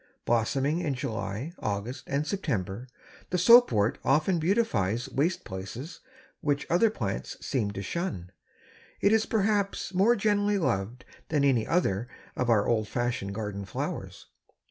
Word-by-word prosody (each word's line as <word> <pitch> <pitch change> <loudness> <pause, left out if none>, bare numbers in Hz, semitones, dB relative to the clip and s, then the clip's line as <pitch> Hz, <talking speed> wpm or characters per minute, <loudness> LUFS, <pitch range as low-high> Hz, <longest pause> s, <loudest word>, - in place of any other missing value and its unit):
Blossoming 135 +7 +1
in 150 -6 -1
July, 115 - -4
August 105 +5 -3
and 140 +2 -1
September, 125 - -3 0.4
the 180 - 0
Soapwort 180 - +6
often 155 +6 +2
beautifies 145 - +1
waste 145 +7 0
places 105 - -7 0.4
which 145 -1 0
other 200 +7 +4
plants 100 - -4
seem 115 -7 0
to 100 -1 -5
shun. 100 - -4 0.7
It 200 - +3
is 220 0 +3
perhaps 200 -2 0
more 200 +6 +4
generally 205 -1 +2
loved 125 - -1 0.2
than 150 -3 +1
any 130 -5 +3
other 120 - +1 0.3
of 125 - -1
our 105 -3 +4
old 110 -2 +1
fashioned 120 -5 -2
garden 105 -2 -4
flowers. 95 - -5
130 Hz, 135 wpm, -28 LUFS, -, 0.7 s, Soapwort